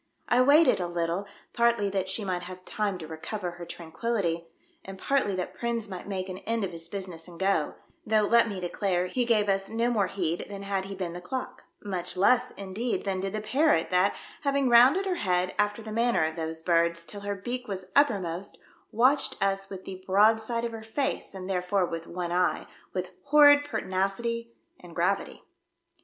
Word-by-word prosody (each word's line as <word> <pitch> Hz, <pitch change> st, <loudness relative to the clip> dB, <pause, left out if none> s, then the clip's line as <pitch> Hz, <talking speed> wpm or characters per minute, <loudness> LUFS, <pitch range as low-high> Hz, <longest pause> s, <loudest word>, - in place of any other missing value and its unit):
I 245 Hz, -, +4 dB
waited 290 Hz, +2 st, +5 dB
a 180 Hz, -, -1 dB
Httle, 175 Hz, +3 st, -2 dB, 0.3 s
partly 235 Hz, -3 st, +2 dB
that 190 Hz, -1 st, -1 dB
she 205 Hz, +2 st, -1 dB
might 180 Hz, -2 st, -1 dB
have 185 Hz, +1 st, -9 dB
time 205 Hz, -3 st, -2 dB
to 160 Hz, -3 st, -8 dB
recover 175 Hz, +4 st, -5 dB
her 175 Hz, 0 st, -9 dB
tran 170 Hz, -1 st, -9 dB
quillity, 180 Hz, -8 st, -1 dB, 0.4 s
and 195 Hz, 0 st, -9 dB
partly 255 Hz, -3 st, +1 dB
that 180 Hz, -1 st, -3 dB
Prins 235 Hz, -2 st, -2 dB
might 185 Hz, -1 st, -7 dB
make 190 Hz, -2 st, -3 dB
an 185 Hz, 0 st, -6 dB
end 225 Hz, +1 st, -2 dB
of 190 Hz, -, -2 dB
his 165 Hz, -1 st, -5 dB
business 180 Hz, -4 st, -5 dB
and 170 Hz, -1 st, -12 dB
go, 190 Hz, -6 st, +1 dB, 0.3 s
though, 215 Hz, 0 st, +2 dB
let 230 Hz, +2 st, +4 dB
me 200 Hz, -2 st, -4 dB
declare, 180 Hz, 0 st, -1 dB
he 245 Hz, +7 st, -1 dB
gave 215 Hz, -3 st, +3 dB
us 195 Hz, 0 st, +1 dB
no 230 Hz, +2 st, 0 dB
more 205 Hz, -5 st, +2 dB
heed 175 Hz, -3 st, -2 dB
than 200 Hz, -1 st, -7 dB
had 195 Hz, -1 st, -2 dB
he 195 Hz, 0 st, -6 dB
been 180 Hz, -3 st, -4 dB
the 175 Hz, -, -7 dB
clock; 255 Hz, +8 st, -5 dB, 0.2 s
much 185 Hz, -3 st, -2 dB
less, 245 Hz, +6 st, +4 dB
indeed, 200 Hz, +6 st, -3 dB
than 190 Hz, -1 st, -1 dB
did 195 Hz, +1 st, -3 dB
the 215 Hz, -, -2 dB
parrot 265 Hz, -, +2 dB
that, 185 Hz, +2 st, +3 dB, 0.3 s
having 280 Hz, -2 st, +1 dB
rounded 255 Hz, +11 st, +6 dB
her 370 Hz, -2 st, -1 dB
head, 180 Hz, -1 st, +1 dB
after 210 Hz, +2 st, +1 dB
the 215 Hz, -, -7 dB
manner 235 Hz, -4 st, +2 dB
of 160 Hz, 0 st, -3 dB
those 160 Hz, -1 st, -4 dB
birds, 170 Hz, -1 st, +2 dB
till 205 Hz, +2 st, -8 dB
her 200 Hz, 0 st, -3 dB
beak 245 Hz, +6 st, -4 dB
was 190 Hz, -2 st, -5 dB
uppermost, 195 Hz, -, +1 dB, 0.3 s
watched 255 Hz, +6 st, +3 dB
us 195 Hz, 0 st, 0 dB
with 190 Hz, -1 st, -8 dB
the 185 Hz, -1 st, -8 dB
broad 215 Hz, +4 st, +5 dB
side 230 Hz, +1 st, -2 dB
of 235 Hz, -, -3 dB
her 225 Hz, -1 st, -7 dB
face, 225 Hz, -1 st, -2 dB
and 185 Hz, -1 st, -6 dB
therefore 185 Hz, 0 st, +1 dB
with 165 Hz, -1 st, -6 dB
one 175 Hz, 0 st, -4 dB
eye, 180 Hz, 0 st, +1 dB, 0.3 s
with 185 Hz, -1 st, -4 dB
horrid 290 Hz, 0 st, +7 dB
pertinacity 230 Hz, +1 st, -2 dB, 0.3 s
and 175 Hz, -2 st, -13 dB
gravity. 180 Hz, +4 st, -1 dB
195 Hz, 200 wpm, -28 LUFS, 180-230 Hz, 0.4 s, horrid